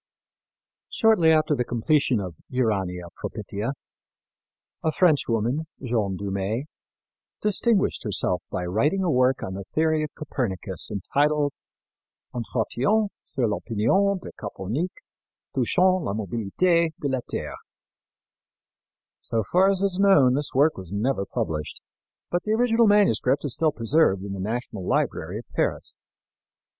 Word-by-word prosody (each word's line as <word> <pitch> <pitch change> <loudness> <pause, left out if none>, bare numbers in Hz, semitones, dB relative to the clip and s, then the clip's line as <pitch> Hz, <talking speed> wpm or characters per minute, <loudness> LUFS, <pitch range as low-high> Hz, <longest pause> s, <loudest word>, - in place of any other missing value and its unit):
" - - -68
Shortly 220 -8 +4
after 155 -1 +3
the 125 - +1
completion 120 +1 +1
of 90 -3 -5 0.2
Urania 95 -8 -1
Propitia, 110 +7 -4 1.1
a 160 - +2
French 155 -3 +3
woman, 120 +8 0
Jeanne 110 -7 -1
Dumée, 100 +5 -2 0.8
distinguished 210 0 +1
herself 95 -4 0
by 90 - -3
writing 145 - +1
a 175 - +1
work 130 0 +2
on 95 - -4
the 100 +1 -5
theory 155 0 +2
of 155 - -2
Copernicus 120 - -3
entitled 145 +8 +1 0.8
Entretiens 125 - 0
sur 130 - -2
l'Opinion 115 - +1
de - - -9
Copernic 110 - -3 0.6
Touchant 185 -1 +3
la 100 - -2
Mobilité 120 - +1
de 145 - -2
la 130 -1 0
Terre. - - -4 1.6
So 115 -1 -1
far 185 +2 +5
as 195 -1 0
known, 145 -11 +6
this 145 +2 0
work 145 +4 +4
was 95 -2 -8
never 100 0 -1
published, 75 -2 -3 0.5
but 175 - +1
the 215 - -1
original 230 0 +3
manuscript 150 - +3
is 140 - -1
still 160 -2 +2
preserved 115 -6 +2
in 100 -1 -5
the 100 - -6
National 110 0 -4
Library - - -1
of - - -8
Paris. - - -1
130 Hz, 130 wpm, -25 LUFS, 105-165 Hz, 1.6 s, known